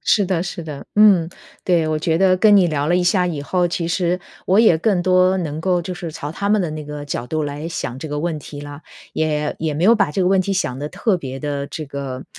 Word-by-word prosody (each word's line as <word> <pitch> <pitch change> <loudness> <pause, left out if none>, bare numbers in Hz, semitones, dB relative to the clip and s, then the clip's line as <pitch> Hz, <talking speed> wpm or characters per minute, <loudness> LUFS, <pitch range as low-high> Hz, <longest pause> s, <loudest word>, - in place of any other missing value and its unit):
是 205 - +2
的 180 -2 0
是 175 -2 -5
的。 150 -3 -8
嗯， 200 -6 +5 0.4
对。 170 -3 +2
我 155 0 0
觉 160 +1 0
得 185 +1 +4
跟 205 +1 +5
你 185 -3 +4
聊 150 -2 -1
了 175 - +2
一 180 - +2
下 180 +1 +2
以 155 -5 -3
后， 180 +4 +1
其 170 -1 -3
实 175 +1 0 0.3
我 195 +4 +4
也 195 -8 +5
更 185 0 +1
多 185 +1 +3
能 155 -3 -4
够 180 0 +1
就 185 +2 -5
是 175 -2 -6
朝 145 - -6
他 200 +5 -3
们 210 -1 +3
的 170 - -2
那 155 0 -6
个 150 0 -7
角 125 -4 -4
度 155 +3 -2
来 145 +2 -4
想 145 -6 -5
这 160 - -6
个 145 0 -3
问 165 -1 -2
题 145 0 -9
啦， 145 0 -9 0.3
也 150 -1 -1
也 155 -2 -2
没 155 - -2
有 210 +5 +6
把 195 -8 +1
这 190 - 0
个 180 - +2
问 190 0 +3
题 195 +2 -1
想 130 -10 -1
得 145 +2 -4
特 210 +4 0
别 135 -5 -7
地 145 -1 -3
这 155 - -6
个 135 -2 -6
165 Hz, 280 characters per minute, -20 LUFS, 150-185 Hz, 0.4 s, 有